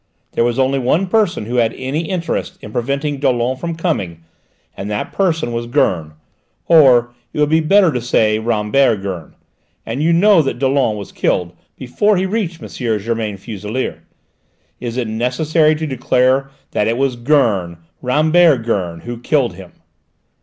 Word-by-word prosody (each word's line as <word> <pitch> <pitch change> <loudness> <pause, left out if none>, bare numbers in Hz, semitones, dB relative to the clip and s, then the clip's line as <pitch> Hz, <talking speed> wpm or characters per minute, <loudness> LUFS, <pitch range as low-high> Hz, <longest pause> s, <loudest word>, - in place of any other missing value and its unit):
There - - +1
was 120 +1 0
only 135 +1 +1
one 150 +9 +1
person 185 - +1
who 120 +3 -3
had 115 -2 +2
any 145 +5 -3
interest 175 -3 -3
in 105 - -8
preventing 140 +4 -2
Dollon 125 -2 +1
from 170 +5 -4
coming, 100 - -3 0.5
and 100 - -6
that 105 0 -3
person 165 -10 0
was 120 0 -3
Gurn, 80 -9 0 0.5
or 125 -7 +5 0.2
it - - -6
would 150 0 +2
be 160 - +4
better 185 +2 +4
to 125 -3 -2
say 110 -3 +2
Rambert 110 0 +1
Gurn; 95 -5 -6 0.5
and 115 +5 -3
you 165 +2 +2
know 185 +1 +5
that 135 - -2
Dollon 130 -4 +1
was 100 - -8
killed 90 -1 -1 0.2
before 200 +11 +1
he 185 - 0
reached 190 -5 -3
M. - - -6 0.3
Germain 110 -1 -3
Fuselier. 105 +5 -5 0.8
Is 120 0 -5
it 125 -3 -1
necessary 150 +8 +1
to 160 +1 -3
declare 130 0 +1 0.2
that 105 - 0
it 115 +1 0
was 135 -1 0
Gurn, 115 - +1 0.2
Rambert 155 +1 +3
Gurn, 90 -7 -2
who 120 -1 -7
killed 130 0 +1
him?" 95 -2 -12
125 Hz, 160 wpm, -17 LUFS, 110-155 Hz, 0.8 s, or